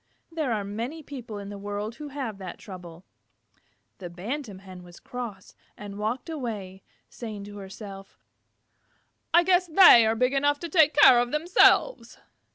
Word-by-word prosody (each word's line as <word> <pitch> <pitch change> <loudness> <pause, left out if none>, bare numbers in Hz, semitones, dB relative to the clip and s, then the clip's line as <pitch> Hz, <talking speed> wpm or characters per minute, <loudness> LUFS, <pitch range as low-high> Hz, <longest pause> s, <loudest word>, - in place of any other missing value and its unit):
There 310 -6 -2
are 215 -3 -1
many 235 +11 -6
people 245 -7 -8
in 200 0 -8
the 205 -1 -8
world 205 +3 -5
who 300 - -8
have 265 -8 -6
that 185 -2 -8
trouble. 180 -3 -11 0.9
The 180 -3 -7
Bantam 210 - -6
Hen 185 -1 -12
was 175 -1 -15
cross, 235 -7 -8 0.2
and 205 -1 -9
walked 220 +4 -3
away, 215 - -6 0.3
saying 215 -4 -8
to 205 0 -10
herself, 195 0 -10 1.1
"I 345 +1 +5
guess 360 0 +2
they 315 - +7
are 220 - +1
big 250 +3 +1
enough 285 +1 +2
to 340 - -5
take 315 -2 +4
care 260 -4 +7
of 240 0 0
themselves." 350 +10 +3
225 Hz, 160 wpm, -26 LUFS, 200-290 Hz, 1.1 s, they